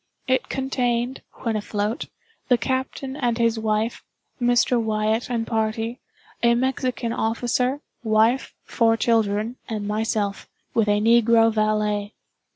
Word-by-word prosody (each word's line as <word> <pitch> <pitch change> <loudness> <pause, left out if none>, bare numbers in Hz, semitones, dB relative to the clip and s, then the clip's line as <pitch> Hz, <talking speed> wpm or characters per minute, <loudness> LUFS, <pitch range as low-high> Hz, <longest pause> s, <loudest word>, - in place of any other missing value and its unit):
It 260 0 0
contained, 250 -2 -1 0.2
when 230 -3 0
afloat, 210 +2 -2 0.4
the 250 - +4
captain 260 +1 -3
and 245 -5 0
his 230 -1 +2
wife, 220 +1 -1 0.4
Mr. 245 0 +3
Wyatt 220 +1 0
and 230 -2 -1
party, 225 +2 -1 0.4
a 235 0 +4
Mexican 255 -2 -1
officer, 245 +5 0 0.2
wife, 225 +3 +2
four 225 -1 +2
children, 225 +1 +1
and 210 -2 -3
myself, 210 -1 -1 0.2
with 225 -2 +2
a 205 0 +3
negro 225 0 +4
valet. 210 -1 0
230 Hz, 120 wpm, -23 LUFS, 215-245 Hz, 0.4 s, the